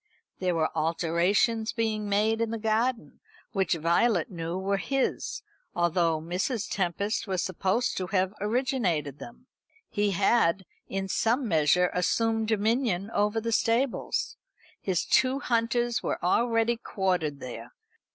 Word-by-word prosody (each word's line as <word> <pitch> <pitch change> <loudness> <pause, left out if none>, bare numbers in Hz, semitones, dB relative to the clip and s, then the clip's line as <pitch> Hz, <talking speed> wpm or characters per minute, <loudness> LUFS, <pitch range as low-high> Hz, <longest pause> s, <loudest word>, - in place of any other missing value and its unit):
There 180 -2 0
were 160 -1 0
alterations 175 +8 +1
being 215 -2 -1
made 215 +3 +2
in 230 - 0
the 230 - -3
garden 225 +3 -1 0.3
which 190 -5 +1
Violet 170 +4 +2
knew 170 0 -4
were 195 +1 0
his, 270 +3 -2 0.3
although 170 -2 +2
Mrs. 185 - -2
Tempest 200 +4 -1
was 185 -2 -1
supposed 190 +6 0
to 185 - -2
have 190 0 0
originated 210 - 0
them. 240 - -11 0.5
He 205 0 +1
had, 195 -1 +2 0.2
in 195 0 -2
some 235 +6 +1
measure, 170 +1 +3
assumed 225 +4 +1
dominion 220 -2 0
over 210 +1 +1
the 230 +1 -3
stables. 230 +3 0 0.4
His 185 -3 0
two 260 +1 +3
hunters 240 -2 0
were - - -2
already 230 +4 +2
quartered 180 -10 -1
there. 120 -2 -8
200 Hz, 130 wpm, -27 LUFS, 175-230 Hz, 0.5 s, measure